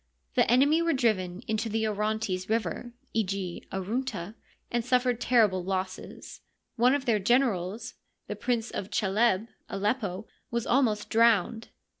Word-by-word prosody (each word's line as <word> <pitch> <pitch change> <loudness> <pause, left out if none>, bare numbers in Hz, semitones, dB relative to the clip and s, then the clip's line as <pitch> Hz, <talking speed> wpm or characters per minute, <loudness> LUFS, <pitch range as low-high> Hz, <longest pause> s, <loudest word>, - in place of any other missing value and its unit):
The - - +3
enemy 285 +7 +4
were 335 0 +2
driven 200 -8 0
into 220 +1 -2
the 220 0 0
Orontes 210 -3 -2
River 225 +1 -1 0.2
(Eg. 195 -4 -2
Aruntd), 205 -1 -3 0.4
and 240 -1 0
suffered 250 -1 +1
terrible 215 -8 +3
losses; 190 0 -5 0.3
one 250 +3 +4
of 280 -2 -3
their 225 -3 +2
generals, 220 -1 +1 0.3
the - - -5
Prince 240 -2 -1
of 195 - -4
Chaleb 210 +1 +1 0.2
(Aleppo), 205 -1 -2 0.2
was 235 -1 -2
almost 230 -5 +1
drowned. 225 -1 +3
220 Hz, 130 wpm, -28 LUFS, 195-240 Hz, 0.4 s, enemy